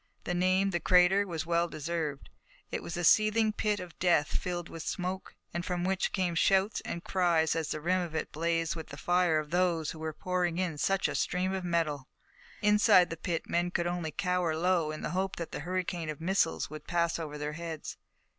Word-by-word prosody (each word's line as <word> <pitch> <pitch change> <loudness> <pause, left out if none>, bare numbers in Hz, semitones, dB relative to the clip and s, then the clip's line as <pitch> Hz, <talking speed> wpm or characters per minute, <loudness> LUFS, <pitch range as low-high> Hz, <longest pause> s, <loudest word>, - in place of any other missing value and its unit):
The 180 - -2
name, 185 +2 +2
the 175 - 0
crater, 185 +3 +4
was 160 -3 -3
well 170 0 +2
deserved. 155 -2 -4 0.4
It - - -2
was 170 - -5
a 175 - -2
seething 215 +4 +4
pit 210 -1 0
of 180 -2 -9
death 175 -4 +3
filled 175 -1 -2
with 165 - -8
smoke, 185 +2 -4 0.2
and 175 - -2
from 180 -1 -2
which 190 +1 0
came 185 -3 0
shouts 195 +5 +2
and 170 - -5
cries 170 -4 +2
as 160 -2 -2
the 155 - -2
rim 180 +4 +1
of 170 -3 -5
it - - -2
blazed 165 +1 0
with 160 -2 -7
the 140 - -9
fire 175 0 +2
of 155 0 -3
those 175 -3 +1
who 160 - -9
were 160 0 -3
pouring 180 +1 -1
in 175 -5 -2
such 195 +4 +2
a - - -3
stream 185 +1 0
of 190 -1 -2
metal. 160 -6 -1 0.6
Inside 210 -4 +5
the - - -2
pit 165 0 -3
the - - -12
men 175 +1 +1
could 175 -1 -1
only 175 -2 -2
cower 180 0 0
low 175 -2 +2
in 155 0 -5
the - - -2
hope 190 +2 -1
that 170 - -6
the - - -4
hurricane 175 0 -3
of 155 - -5
missiles 170 0 +1
would 155 0 -10
pass 170 -1 +1
over 150 -2 -5
their 150 0 -4
heads. 165 -1 -6
175 Hz, 215 wpm, -30 LUFS, 160-185 Hz, 0.6 s, Inside